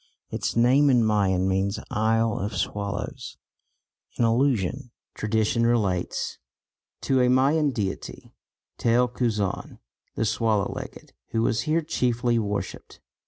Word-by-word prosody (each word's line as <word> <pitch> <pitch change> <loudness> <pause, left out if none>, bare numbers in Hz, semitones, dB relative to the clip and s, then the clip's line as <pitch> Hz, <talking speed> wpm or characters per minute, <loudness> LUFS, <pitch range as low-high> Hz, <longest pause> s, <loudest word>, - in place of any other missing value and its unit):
Its - - -2
name 130 +5 +4
in 125 -3 +4
Mayan 95 -4 +2
means 95 +2 0
"Isle 110 +1 +1
of 100 0 -3
Swallows," 100 +5 -4 0.8
in 120 - +3
allusion, 125 0 +1 0.2
tradition 110 +2 0
relates, 105 -7 0 0.6
to 130 -1 +2
a 125 - +3
Mayan 140 +4 +3
deity 105 -7 -5 0.5
Tel 120 +2 +3
Cuzaan 110 -5 -2 0.4
(the 110 - 0
swallow 110 -2 +1
legged) - - -9 0.2
who 115 0 +1
was 110 -1 +1
here 165 +1 +2
chiefly 120 -6 0
worshipped. 105 -2 -4
115 Hz, 120 wpm, -25 LUFS, 105-125 Hz, 0.8 s, name